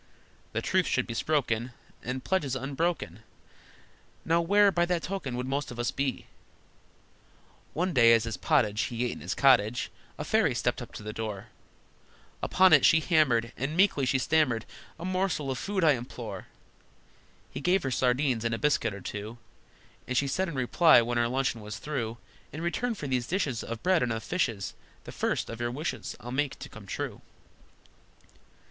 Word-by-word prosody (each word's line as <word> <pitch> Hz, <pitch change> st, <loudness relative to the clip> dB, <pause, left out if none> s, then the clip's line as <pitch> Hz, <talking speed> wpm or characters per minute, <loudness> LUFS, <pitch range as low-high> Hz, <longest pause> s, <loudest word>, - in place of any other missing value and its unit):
That -, -, -2 dB
truth -, -, +2 dB
should -, -, +1 dB
be 115 Hz, -, -5 dB
spoken, 120 Hz, -3 st, 0 dB, 0.3 s
And 130 Hz, +1 st, -4 dB
pledges 150 Hz, -9 st, 0 dB
unbroken: 135 Hz, -, -2 dB, 1.1 s
(Now 165 Hz, +1 st, +3 dB
where, 200 Hz, +4 st, +4 dB
by 175 Hz, -2 st, +2 dB
that 175 Hz, -2 st, 0 dB
token, 170 Hz, -10 st, -4 dB
would 125 Hz, -, -2 dB
most 140 Hz, +2 st, -2 dB
of 120 Hz, -, -8 dB
us 120 Hz, 0 st, -1 dB
be?) 135 Hz, -2 st, -2 dB, 1.5 s
One 180 Hz, +2 st, 0 dB
day, 115 Hz, -4 st, +6 dB
as 115 Hz, -1 st, +4 dB
his 115 Hz, -1 st, -3 dB
pottage 105 Hz, 0 st, +2 dB
He 120 Hz, +1 st, -2 dB
ate 120 Hz, -, -1 dB
in -, -, -7 dB
his -, -, -4 dB
cottage, 125 Hz, -4 st, +3 dB, 0.3 s
A -, -, -4 dB
fairy -, -, +2 dB
stepped -, -, -1 dB
up -, -, -8 dB
to -, -, -8 dB
the 110 Hz, 0 st, -5 dB
door; 105 Hz, -3 st, -5 dB, 0.9 s
Upon 185 Hz, -2 st, +4 dB
it 145 Hz, -, +7 dB
she 160 Hz, -, +6 dB
hammered, 135 Hz, -8 st, +2 dB
And 145 Hz, +5 st, -3 dB
meekly 180 Hz, -9 st, +3 dB
she 130 Hz, +2 st, +2 dB
stammered: 130 Hz, -5 st, +1 dB, 0.3 s
"A 170 Hz, -, -6 dB
morsel 185 Hz, -6 st, -1 dB
of 130 Hz, -, -3 dB
food 200 Hz, -2 st, -1 dB
I 155 Hz, -, +6 dB
implore." 120 Hz, -6 st, -5 dB, 1.0 s
He -, -, -6 dB
gave 180 Hz, +4 st, +2 dB
her 135 Hz, -, -2 dB
sardines, 125 Hz, -1 st, +1 dB
and 115 Hz, -1 st, 0 dB
a -, -, -4 dB
biscuit 115 Hz, -8 st, +1 dB
or 100 Hz, -, -9 dB
two, 105 Hz, +5 st, -6 dB, 0.7 s
And 130 Hz, -, -1 dB
she 140 Hz, -, +3 dB
said 185 Hz, +7 st, -1 dB
in 165 Hz, -, -6 dB
reply, 130 Hz, +2 st, +5 dB
when 120 Hz, +1 st, -1 dB
her 120 Hz, -, +2 dB
luncheon 130 Hz, -2 st, -1 dB
was 105 Hz, +1 st, -6 dB
through, 120 Hz, -5 st, -4 dB, 0.3 s
"In 155 Hz, +4 st, -6 dB
return 230 Hz, +7 st, -1 dB
for 150 Hz, -, -7 dB
these 125 Hz, -3 st, -1 dB
dishes 150 Hz, -, -1 dB
Of 115 Hz, 0 st, -6 dB
bread 180 Hz, -2 st, +3 dB
and 125 Hz, -, 0 dB
of 115 Hz, -1 st, -3 dB
fishes 115 Hz, -, -1 dB, 0.3 s
The -, -, -9 dB
first -, -, -1 dB
of 115 Hz, +1 st, -7 dB
your 120 Hz, -, 0 dB
wishes 145 Hz, +7 st, -4 dB
I'll 120 Hz, -, -8 dB
make 140 Hz, +1 st, -1 dB
to -, -, -9 dB
come -, -, -12 dB
true!" -, -, -4 dB
130 Hz, 185 wpm, -28 LUFS, 115-160 Hz, 1.5 s, it